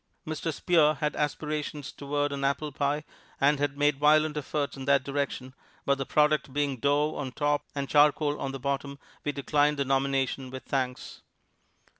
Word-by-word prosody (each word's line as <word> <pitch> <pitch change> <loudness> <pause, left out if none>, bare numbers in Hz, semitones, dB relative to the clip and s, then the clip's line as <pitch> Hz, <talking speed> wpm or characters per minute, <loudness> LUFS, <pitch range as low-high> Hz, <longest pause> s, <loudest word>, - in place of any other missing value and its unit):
Mr. 155 +1 -3
Spear 155 -1 +3
had 150 0 -2
aspirations 150 -1 -3
toward 145 0 -2
an 140 -1 -4
apple 140 +2 0
pie 145 +1 -1 0.4
and 145 +1 +3
had 145 -1 -1
made 145 -1 +2
violent 155 +1 +4
efforts 145 0 -2
in 135 -1 -7
that 140 -1 +3
direction, 140 -2 -3 0.3
but 140 0 +2
the 135 - -3
product 150 -2 +2
being 140 -1 -1
dough 145 +4 +1
on 135 -3 -4
top 145 +2 0
and 140 -1 -2
charcoal 150 0 +3
on 135 - -2
the 135 - -6
bottom 140 +1 -3 0.3
we 145 - 0
declined 145 +1 +1
the 140 - 0
nomination 135 -1 0
with 130 0 -8
thanks. 130 -2 -3
145 Hz, 170 wpm, -28 LUFS, 135-150 Hz, 0.4 s, violent